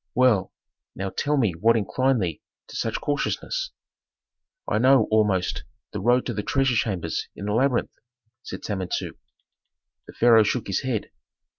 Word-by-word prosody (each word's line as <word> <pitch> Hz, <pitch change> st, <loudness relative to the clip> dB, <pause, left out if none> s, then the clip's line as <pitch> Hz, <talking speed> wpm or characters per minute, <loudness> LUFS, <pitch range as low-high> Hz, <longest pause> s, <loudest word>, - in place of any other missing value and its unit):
Well, 125 Hz, -7 st, +3 dB, 0.4 s
now, 95 Hz, 0 st, -4 dB
tell 150 Hz, 0 st, 0 dB
me 115 Hz, -8 st, +2 dB
what 115 Hz, +8 st, +3 dB
inclined 130 Hz, +2 st, +1 dB
thee 85 Hz, -4 st, -3 dB, 0.3 s
to -, -, -10 dB
such -, -, -2 dB
cautiousness?" -, -, -2 dB, 1.0 s
"I -, -, +1 dB
know, 130 Hz, -1 st, +5 dB
almost, 105 Hz, -4 st, +1 dB, 0.3 s
the 105 Hz, -, -4 dB
road 120 Hz, +4 st, +3 dB
to -, -, -2 dB
the 105 Hz, -, -2 dB
treasure 135 Hz, +3 st, +1 dB
chambers 95 Hz, -6 st, -1 dB
in 100 Hz, -, -7 dB
the 105 Hz, -, -1 dB
labyrinth," 125 Hz, +2 st, +1 dB, 0.5 s
said -, -, -8 dB
Samentu. 95 Hz, -4 st, -3 dB, 0.9 s
The -, -, -11 dB
pharaoh 115 Hz, -1 st, +6 dB
shook 110 Hz, +3 st, 0 dB
his 95 Hz, -, -1 dB
head. 130 Hz, -5 st, -3 dB
115 Hz, 150 wpm, -24 LUFS, 100-130 Hz, 1.0 s, pharaoh